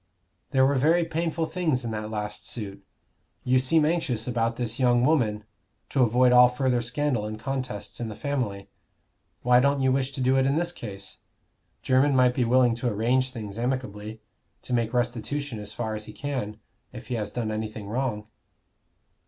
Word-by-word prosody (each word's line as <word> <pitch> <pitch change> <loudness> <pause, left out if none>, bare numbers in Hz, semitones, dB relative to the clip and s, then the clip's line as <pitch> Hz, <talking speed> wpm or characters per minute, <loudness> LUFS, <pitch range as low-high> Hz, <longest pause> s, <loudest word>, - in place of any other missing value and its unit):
"There 130 0 +4
were 140 - +3
very 165 +6 +3
painful 165 0 -1
things 160 -8 -1
in 115 - -3
that 110 0 -4
last 105 -1 -4
suit. 100 -4 -6 0.6
You 130 +1 +3
seem 150 +4 +3
anxious 150 -9 0
about 115 -1 0
this 120 0 -2
young 120 -1 +4
woman, 115 -9 +2 0.5
to 135 - +1
avoid 125 +1 +4
all 125 0 +8
further 125 -1 0
scandal 120 -2 -1
and 110 0 -6
contests 130 -4 -5
in 115 -2 -3
the 105 - -7
family. 120 -9 -3 0.8
Why 125 0 +5
don't 140 +1 +2
you 130 - +3
wish 130 0 0
to 140 - -6
do 130 +1 +3
it 130 - +3
in 140 - +2
this 170 +2 0
case? 100 - -8 0.7
Jermyn 135 +2 +3
might 125 -1 +4
be 125 -1 +1
willing 125 0 +4
to 120 0 -1
arrange 120 +5 +1
things 110 -4 -7
amicably 110 -4 -3 0.4
to - - -5
make 115 -2 +1
restitution 120 +1 -2
as 105 0 -7
far 110 +1 -3
as 105 0 -5
he - - -10
can 130 -8 -4 0.3
if 120 -1 -9
he - - -2
has 105 -3 -2
done 110 0 -3
anything 110 -1 -5
wrong." 115 -2 -2
125 Hz, 180 wpm, -26 LUFS, 110-135 Hz, 0.8 s, all